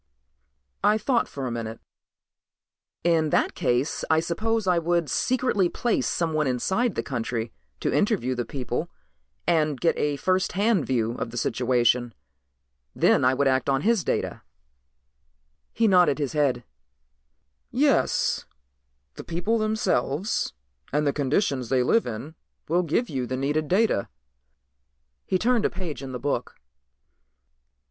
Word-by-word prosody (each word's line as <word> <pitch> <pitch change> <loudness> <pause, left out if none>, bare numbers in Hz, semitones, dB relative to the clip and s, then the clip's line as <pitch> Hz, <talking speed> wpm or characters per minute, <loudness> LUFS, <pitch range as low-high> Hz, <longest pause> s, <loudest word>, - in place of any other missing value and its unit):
I 210 +1 +4
thought 235 +3 +1
for 135 -2 -6
a 125 - -3
minute. 115 -1 -5 1.2
"In 165 -2 +2
that - - +1
case 130 -2 0
I 160 0 +4
suppose 215 +7 -1
I 180 -2 +3
would 170 -3 0
secretly 245 -8 +1
place 240 +5 0
someone 155 -3 0
inside 190 - 0
the - - -1
country 115 -3 -3 0.3
to - - 0
interview 200 - +1
the 120 -1 -2
people 130 +6 -4 0.6
and 155 -5 +1
get 165 - +2
a 145 -1 +1
first 185 +6 0
hand 200 -3 +2
view 115 -3 +1
of - - -3
the 120 - -8
situation. 120 0 +1 0.8
Then - - +3
I 130 +1 +4
would 140 +1 +2
act 130 +1 +1
on 135 0 +2
his 220 -2 +2
data." - - -2 1.3
He 225 0 +2
nodded 180 -7 +4
his 145 -4 -2
head. 135 -5 +1 1.1
"Yes, - - +1 0.7
the - - -9
people 180 +7 -1
themselves 215 - 0 0.4
and 150 +2 +1
the 140 - +2
conditions 140 - 0
they 130 -2 +3
live 225 - +2
in 120 +7 -6 0.3
will 175 +3 +2
give 180 +9 0
you 130 -3 -3
the 130 - -3
needed 145 +3 0
data." 195 - +2 1.2
He 185 - +2
turned 235 +2 +2
a - - +2
page 175 -8 -6
in 135 -1 -6
the 125 - -4
book. 145 +3 -3
150 Hz, 140 wpm, -25 LUFS, 130-190 Hz, 1.3 s, I